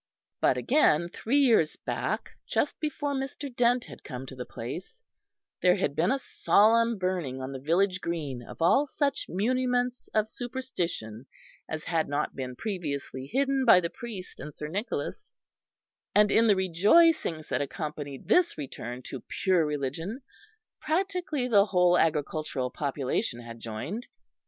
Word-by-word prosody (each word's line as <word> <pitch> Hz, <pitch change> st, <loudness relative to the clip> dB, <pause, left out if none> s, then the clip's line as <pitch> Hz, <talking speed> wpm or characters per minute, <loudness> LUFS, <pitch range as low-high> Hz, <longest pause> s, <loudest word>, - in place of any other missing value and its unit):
But 130 Hz, -, +3 dB
again, 170 Hz, -, +3 dB
three 230 Hz, +8 st, 0 dB
years 230 Hz, -, +4 dB
back, -, -, -3 dB, 0.2 s
just 290 Hz, -, 0 dB
before 295 Hz, -2 st, -2 dB
Mr. 270 Hz, -1 st, -4 dB
Dent 245 Hz, 0 st, +3 dB
had -, -, -12 dB
come 130 Hz, -2 st, -6 dB
to 135 Hz, -, -9 dB
the 125 Hz, -1 st, -6 dB
place, 185 Hz, -, -7 dB, 0.6 s
there 180 Hz, -1 st, +5 dB
had 140 Hz, -, -1 dB
been 175 Hz, +5 st, +2 dB
a 270 Hz, -, +2 dB
solemn 230 Hz, -2 st, +3 dB
burning 180 Hz, -8 st, -2 dB
on 130 Hz, +1 st, -5 dB
the 135 Hz, -, -5 dB
village 185 Hz, +6 st, +1 dB
green 150 Hz, -7 st, -3 dB
of 140 Hz, -, -6 dB
all 275 Hz, -, +4 dB
such 280 Hz, 0 st, -1 dB
muniments 250 Hz, +4 st, 0 dB
of 215 Hz, 0 st, +2 dB
superstition 180 Hz, -, -4 dB, 0.4 s
as 155 Hz, 0 st, -4 dB
had 165 Hz, -2 st, 0 dB
not 145 Hz, +1 st, -1 dB
been 130 Hz, -1 st, -5 dB
previously 140 Hz, -, -4 dB
hidden 275 Hz, 0 st, +2 dB
by 225 Hz, -7 st, +8 dB
the 170 Hz, -2 st, -3 dB
priest 230 Hz, -7 st, -7 dB
and 150 Hz, -, -8 dB
Sir 150 Hz, -, -5 dB
Nicholas; 205 Hz, +8 st, -4 dB, 0.8 s
and 210 Hz, 0 st, +5 dB
in 230 Hz, +1 st, +5 dB
the 205 Hz, -, +5 dB
rejoicings 190 Hz, -, +3 dB
that -, -, 0 dB
accompanied 145 Hz, -1 st, -5 dB
this 360 Hz, -1 st, +3 dB
return 125 Hz, -3 st, -6 dB
to 130 Hz, -, -7 dB, 0.2 s
pure 185 Hz, -3 st, +4 dB
religion 150 Hz, -, -3 dB, 0.6 s
practically 340 Hz, -5 st, -1 dB
the 205 Hz, -4 st, +5 dB
whole 180 Hz, -2 st, +4 dB
agricultural 155 Hz, -5 st, 0 dB
population 135 Hz, -4 st, -2 dB
had 115 Hz, -1 st, -9 dB
joined. 145 Hz, -, -5 dB
180 Hz, 145 wpm, -28 LUFS, -, 0.8 s, by